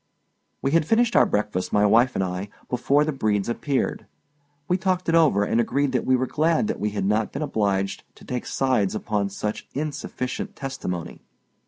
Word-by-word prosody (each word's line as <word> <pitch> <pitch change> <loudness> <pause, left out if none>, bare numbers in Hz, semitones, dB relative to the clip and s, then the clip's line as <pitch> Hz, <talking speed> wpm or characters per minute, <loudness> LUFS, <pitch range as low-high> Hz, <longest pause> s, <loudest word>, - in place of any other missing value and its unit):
We 135 - +1
had 160 -1 +3
finished 235 +1 +3
our - - +6
breakfast, 105 -3 -1
my 105 0 +4
wife 115 +5 +4
and - - +1
I, 90 +2 -4 0.2
before 140 +4 +2
the 155 - 0
Bredes 105 -6 0
appeared. 135 +3 -1 0.6
We 180 - +2
talked 185 -1 0
it 165 - +2
over, 155 -12 +4
and 115 +3 +2
agreed 140 +4 0
that 125 - -1
we 130 - +5
were 130 +1 +1
glad 160 - +1
that - - -2
we 105 - 0
had 105 -2 -2
not 105 +2 +1
been 140 - -3
obliged 100 -7 -1
to - - -16
take 125 -1 -4
sides 125 -7 +1
upon 105 -2 -1
such 105 +2 -4
insufficient 140 -3 -4
testimony. 130 -11 -5
125 Hz, 185 wpm, -24 LUFS, 105-145 Hz, 0.6 s, our